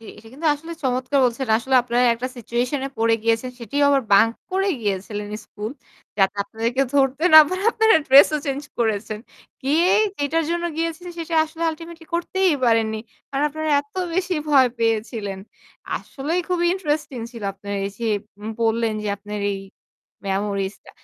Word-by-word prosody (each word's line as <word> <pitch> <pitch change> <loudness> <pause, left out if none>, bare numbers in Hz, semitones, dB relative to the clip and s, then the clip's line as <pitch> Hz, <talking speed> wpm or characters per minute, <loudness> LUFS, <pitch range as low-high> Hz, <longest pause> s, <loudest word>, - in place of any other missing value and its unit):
জি। - - -15
এটা 225 - -14
কিন্তু 300 +5 -4
আসলে 325 +3 -9
চমৎকার 255 +1 0
বলছেন। 250 +2 0
আসলে 260 +3 -2
আপনারা 245 0 +1
একটা 245 +2 -4
সিচুয়েশন 245 +4 -2
এ - - -5
পড়ে 225 0 +3
গিয়েছেন। 230 +2 +1
সেটিও 285 +6 0
আবার 275 -1 +3
বাঙ্ক 220 +3 +6 0.2
করে 385 +1 +1
গিয়েছিলেন 205 0 -3 0.2
স্কুল। 215 +3 -6 0.5
যাতে 195 +1 +3
আপনাদেরকে 230 +5 -1
ধরতে 275 +2 +2
না 315 - +13
পারে 370 +3 -3
আপনারা 445 -3 +5
ড্রেস 275 +2 +8
ও - - -2
চেঞ্জ 275 +1 -2 0.2
করেছেন। 215 -2 -1 0.4
গিয়েই 330 +10 +3 0.2
যেটার 315 +3 0
জন্য 345 0 -1
গিয়েছিলেন 330 +2 -3
সেটা 330 0 -4
আসলে 320 +1 -8
আল্টিমেটলি 330 +1 -10
করতেই 370 +1 +1
পারেননি। 225 -2 +2 0.3
কারণ 275 +1 0
আপনারা 310 +1 -3
এত 285 0 -21 0.2
বেশি 370 0 0
ভয় 270 -4 +6
পেয়েছিলেন। 220 -3 -1 0.6
আসলেই 310 +6 -3
খুবই 350 -1 +1
ইন্টারেস্টিং 300 -7 -2
ছিল 230 -3 -9
আপনারা 200 +1 -6
এইযে 205 +4 -5 0.3
উম 210 - -6
বললেন 225 0 +1
যে 210 - -3
আপনার 205 +1 -6
এই 195 - -5 0.7
মেমোরিজটা। 200 0 -3
255 Hz, 160 wpm, -22 LUFS, 220-315 Hz, 0.7 s, না